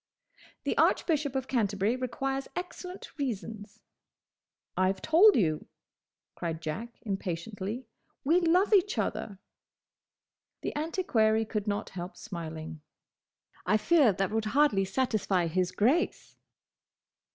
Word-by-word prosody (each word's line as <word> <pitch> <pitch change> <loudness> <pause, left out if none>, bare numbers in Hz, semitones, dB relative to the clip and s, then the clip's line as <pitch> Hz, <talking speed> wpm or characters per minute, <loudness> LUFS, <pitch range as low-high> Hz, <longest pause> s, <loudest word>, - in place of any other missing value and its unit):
"The - - -1
Archbishop 295 -5 +2
of 265 0 -1
Canterbury 210 -2 +1
requires 270 +2 -2
excellent 360 +1 -7
reasons." 215 -5 -5 0.9
"I 185 0 +3
've 190 - -7
told 365 - +6
you," 155 -8 +1 0.7
cried 165 -2 -4
Jack 220 +10 -5
impatiently, 200 +3 -4 0.4
"we 325 +6 +4
love 360 +5 +3
each 405 +1 +4
other!" 200 -3 -2 1.2
The - - -4
antiquary 235 - +1
could 210 -1 -3
not 205 0 -1
help 180 +1 -7
smiling. 160 -3 -7 0.9
"I 215 - +4
fear 275 +2 +4
that 195 +1 -1
would 220 0 0
hardly 245 -10 +4
satisfy 200 -5 0
his 180 +2 0
Grace!" 265 - +1
220 Hz, 110 wpm, -29 LUFS, 190-285 Hz, 1.2 s, told